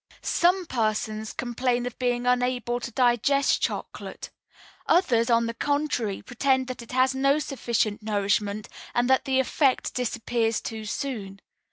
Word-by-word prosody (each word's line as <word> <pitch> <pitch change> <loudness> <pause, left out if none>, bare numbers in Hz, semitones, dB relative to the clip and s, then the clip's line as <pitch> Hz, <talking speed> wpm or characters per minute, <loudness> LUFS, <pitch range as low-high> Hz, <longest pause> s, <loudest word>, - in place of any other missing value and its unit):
"Some 360 +2 +2
persons 215 -4 -1
complain 245 0 -1
of 245 - -6
being 245 -1 0
unable 250 -1 +1
to 240 - -5
digest 250 +3 +2
chocolate; - - -4 0.6
others, 250 -10 +3
on 230 0 +4
the 230 - -3
contrary, 285 -7 -1
pretend 260 +2 +1
that 255 - -5
it 235 - -11
has 260 +1 +3
not 275 +3 +2
sufficient 225 -5 -1
nourishment, 205 0 0 0.3
and 240 0 +2
that 265 - +3
the 265 -1 +2
effect 265 0 +1
disappears 235 -2 -1
too 220 -1 -6
soon. 210 -4 -4
245 Hz, 140 wpm, -26 LUFS, 225-265 Hz, 0.6 s, on